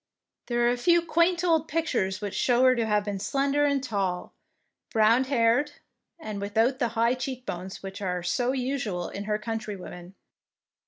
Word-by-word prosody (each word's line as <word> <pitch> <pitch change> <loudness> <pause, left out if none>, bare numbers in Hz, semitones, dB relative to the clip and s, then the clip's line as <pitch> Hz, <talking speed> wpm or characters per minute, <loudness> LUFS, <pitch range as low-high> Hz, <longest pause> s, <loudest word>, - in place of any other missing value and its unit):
There 240 -1 +1
are - - +4
a 245 - -1
few 340 +7 +3
quaint 340 +2 +2
old 325 -3 +2
pictures 195 -13 -1
which 205 -1 -4
show 245 +5 +2
her 255 0 +6
to 230 -2 0
have 210 -1 +1
been 200 -2 -3
slender 280 +6 +1
and 280 -2 +1
tall, 195 -7 -2 0.6
brown 225 +3 +4
haired, 255 +2 +2 0.5
and 215 -9 -6
without 225 +6 +1
the 240 - +2
high 230 +2 +3
cheek 255 0 -5
bones 185 +3 -6
which 195 +1 -7
are 180 -2 -2
so 245 +8 0
usual 250 -9 -2
in 200 +1 -6
her 210 0 0
countrywomen. 210 -5 -6
235 Hz, 170 wpm, -27 LUFS, 200-270 Hz, 0.6 s, her